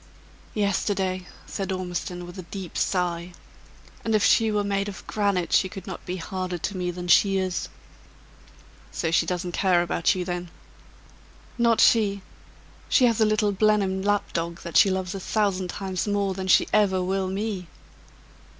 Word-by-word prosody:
"Yesterday," 190 -2 0 0.2
said 195 -2 -4
Ormiston, 180 -1 -4
with 175 +2 -10
a 170 - -10
deep 190 -4 -7
sigh. 175 -1 -1 0.7
"And 225 -1 +1
if 210 - +3
she 220 +3 +4
were 210 -1 +1
made 200 0 -1
of 195 - -10
granite, 200 -4 0
she 190 - +4
could 190 -1 -9
not 190 - -7
be 180 - -2
harder 185 0 -4
to 190 +4 -4
me 180 -1 -2
than 175 0 -5
she 195 +2 +5
is!" 185 -1 -2 1.2
"So 160 - -2
she 165 0 +2
doesn't 180 0 -2
care 175 -1 +2
about 175 +2 +1
you, 180 -1 -3
then?" 175 -1 -4 1.1
"Not 235 -1 +3
she! 200 -4 +4 0.7
She 255 - +5
has 230 -2 +2
a - - +6
little 215 -1 +2
Blenheim 200 -2 +2
lapdog, 170 -4 -1
that 170 - -8
she 200 - +7
loves 185 0 -2
a 195 - -4
thousand 190 -2 0
times 190 +1 -3
more 200 -1 0
than 190 0 -5
she - - +5
ever 190 -3 +3
will 190 +1 -1
me!" 195 -1 -3
190 Hz, 165 wpm, -25 LUFS, 180-205 Hz, 1.2 s, she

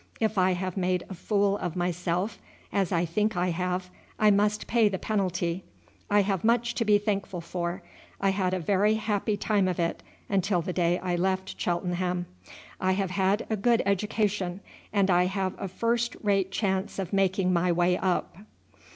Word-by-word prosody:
If 220 -1 +1
I 185 -1 +3
have 185 +1 -3
made 180 -1 0
a - - -5
fool 200 +2 +1
of 175 -1 -3
myself, 180 +3 -1 0.3
as 195 -3 +1
I 170 -1 +2
think 210 +4 0
I 180 0 +1
have, 180 +1 -2 0.3
I 215 -1 +5
must 210 +1 +2
pay 225 -3 +3
the 190 - -2
penalty. 185 -4 -1 0.5
I 205 0 +4
have 195 -3 -1
much 235 +1 +2
to 235 - 0
be 210 -1 +5
thankful 200 -3 -2
for. 170 +1 -4 0.4
I 195 0 +2
had 185 -1 0
a - - -1
very 200 +5 +2
happy 210 -1 -1
time 205 -2 +1
of 180 -2 -2
it 170 0 -1 0.3
until 195 -3 +1
the 180 - -3
day 175 0 +2
I 180 -1 -2
left 190 +1 -1
Cheltenham. 180 0 -1 0.5
I 185 0 +2
have 190 -1 -1
had 195 +2 +1
a 220 - 0
good 230 +3 +2
education, 200 -2 0 0.3
and 200 -2 +2
I 180 0 +4
have 190 -1 -1
a 195 - -2
first 235 +5 0
rate 195 -2 +2
chance 195 -1 -1
of 195 -2 -4
making 190 -1 +2
my 175 +1 +2
way 175 +1 +3
up. 180 -2 -1
190 Hz, 180 wpm, -27 LUFS, 180-205 Hz, 0.5 s, I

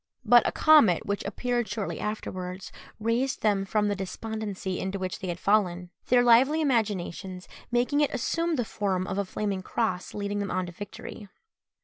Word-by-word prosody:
But 240 +1 +6
a - - +1
comet 230 - +5
which 200 -1 -2
appeared 240 +3 -1
shortly 210 0 -4
afterwards 185 -3 -5 0.3
raised 235 +4 0
them 200 -2 +2
from 210 +1 +1
the 205 - 0
despondency 195 -1 -4
into 190 +1 -3
which 185 -1 -4
they 190 - -5
had 175 -1 -3
fallen; 180 -3 +1 0.2
their 245 0 +5
lively 255 +6 +5
imaginations 200 - -1 0.2
making 245 +5 +2
it 295 - +2
assume 335 +6 0
the 245 -5 -1
form 190 -4 -1
of 195 - -3
a 200 - 0
flaming 200 0 -3
cross 185 -2 -2
leading 205 0 -2
them 200 -1 -2
on 185 0 -1
to 175 - -8
victory. 205 +2 -9
205 Hz, 170 wpm, -27 LUFS, 190-235 Hz, 0.3 s, But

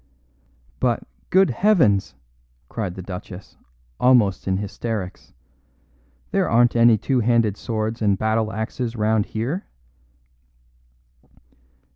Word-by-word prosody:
"But, - - 0 0.3
good 190 -5 +4
heavens!" 110 - +2 0.5
cried 100 -6 -4
the 95 - -7
Duchess, 90 +1 -9 0.4
almost 115 -8 +3
in 95 0 +1
hysterics, 105 -1 -5 1.0
"there - - +1
aren't 120 +1 +3
any 115 -1 +5
two 130 +5 0
handed 115 -3 +2
swords 110 0 -3
and 100 -2 +2
battle 110 +1 0
axes 115 +3 -4
round 110 -1 +1
here." 130 - -3
110 Hz, 100 wpm, -22 LUFS, 100-120 Hz, 1.0 s, any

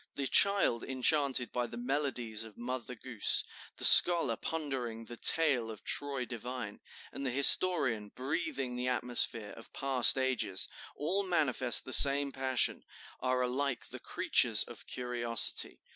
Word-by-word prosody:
The 140 - -4
child 195 - +1
enchanted 130 -1 -1
by 120 -1 -4
the 120 - -11
melodies 125 -4 -4
of 110 -2 -15
Mother 125 +1 -7
Goose, 115 -2 -2 0.3
the - - -3
scholar 170 -10 +8
pondering 130 -7 -7
'the 120 +1 -12
tale 135 -8 +1
of 110 -2 -11
Troy 140 -3 -5
divine,' 120 -3 -9 0.3
and - - -9
the 135 - -3
historian 130 - +3
breathing 135 -1 -6
the 125 +1 -5
atmosphere 120 -3 -2
of 115 - -15
past 135 -2 +4
ages, 130 -8 -1 0.3
all 180 +7 -3
manifest 145 -9 0
the 130 - -6
same 140 0 +5
passion, 130 -2 -2 0.4
are 130 0 -2
alike 130 0 -4
the - - -10
creatures - - +1
of - - -14
curiosity. 120 -2 -1
125 Hz, 140 wpm, -30 LUFS, 120-140 Hz, 0.4 s, scholar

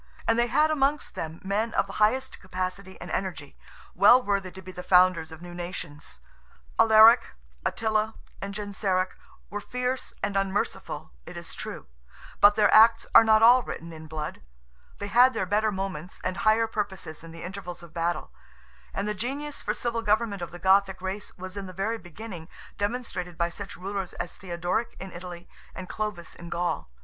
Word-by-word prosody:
And 225 +1 +3
they 240 - +3
had 305 +5 +3
amongst 290 0 +1
them 160 +1 -5
men 210 +4 -1
of - - +3
the - - -9
highest 260 +5 +1
capacity 185 0 -5
and - - -8
energy, 155 -7 -4 0.4
well 250 - +7
worthy 200 -5 -1
to 190 - -11
be 185 - -8
the 180 - -7
founders 180 -3 +4
of 160 +1 -10
new 175 0 -9
nations. 150 - -7 0.6
Alaric, 220 - +7 0.3
Attila, 220 0 0 0.3
and 200 - -4
Genseric, 195 -2 -1 0.4
were 205 0 -3
fierce 250 +3 -2
and 200 0 -1
unmerciful 195 +1 -2 0.2
it - - -8
is - - -7
true; - - -7 0.5
but 205 0 +7
their 210 -1 +4
acts 225 +1 +7
are - - +10
not 220 0 +5
all 245 +2 +8
written 170 -7 -7
in 160 0 -10
blood; 155 -1 -5 0.6
they 205 - -5
had 245 +4 +5
their 220 - 0
better 210 +3 +2
moments 190 -3 -5
and 185 +1 -2
higher 225 0 +4
purposes 195 -8 -4
in 165 - -10
the 165 0 -9
intervals 180 -1 -7
of 170 - -13
battle; 170 -1 -2 0.6
and 200 +1 -1
the 210 - 0
genius 280 +8 -4
for - - -1
civil 235 -2 -2
government 210 -2 +1
of 175 - -4
the 175 - -9
Gothic 190 +1 +3
race 190 +2 -5
was 185 +1 -8
in 200 -1 -5
the 185 - -9
very 220 +5 -2
beginning 175 -2 -9 0.3
demonstrated 205 -6 -3
by 170 0 +1
such 200 +3 -8
rulers 195 0 -4
as 175 - -5
Theodoric 180 +4 -2
in 190 0 -7
Italy 175 0 -9 0.3
and 185 - -7
Clovis 210 -6 -4
in 170 0 -10
Gaul. 170 - -2
195 Hz, 180 wpm, -27 LUFS, 175-220 Hz, 0.6 s, are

